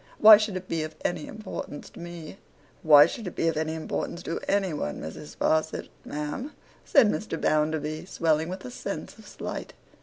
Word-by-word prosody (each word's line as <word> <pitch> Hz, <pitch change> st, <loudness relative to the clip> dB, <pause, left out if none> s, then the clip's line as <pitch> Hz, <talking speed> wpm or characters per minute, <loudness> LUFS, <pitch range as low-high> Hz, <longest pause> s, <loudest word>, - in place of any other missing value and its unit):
Why 215 Hz, 0 st, +10 dB
should 210 Hz, -3 st, -2 dB
it 185 Hz, 0 st, -8 dB
be 165 Hz, -1 st, -1 dB
of 155 Hz, 0 st, -5 dB
any 155 Hz, -3 st, -1 dB
importance 210 Hz, -8 st, -7 dB
to -, -, -13 dB
me?' 170 Hz, 0 st, -8 dB, 0.4 s
'Why 150 Hz, -2 st, +9 dB
should 210 Hz, +5 st, -5 dB
it 180 Hz, -, -6 dB
be -, -, +1 dB
of 165 Hz, -, -2 dB
any 160 Hz, +1 st, -1 dB
importance 170 Hz, +2 st, -4 dB
to 165 Hz, -, -3 dB
any 195 Hz, -4 st, +1 dB
one, 75 Hz, -, -3 dB
Mrs. 115 Hz, -, -8 dB
Sparsit, 160 Hz, 0 st, 0 dB, 0.2 s
ma'am?' 150 Hz, -, -4 dB, 0.3 s
said 275 Hz, -7 st, +5 dB
Mr. 210 Hz, -5 st, -2 dB
Bounderby, 155 Hz, 0 st, 0 dB
swelling 160 Hz, -3 st, +1 dB
with 185 Hz, +1 st, -6 dB
a 250 Hz, -, -7 dB
sense -, -, -6 dB
of -, -, -14 dB
slight. -, -, -6 dB
165 Hz, 185 wpm, -27 LUFS, 155-195 Hz, 0.4 s, Why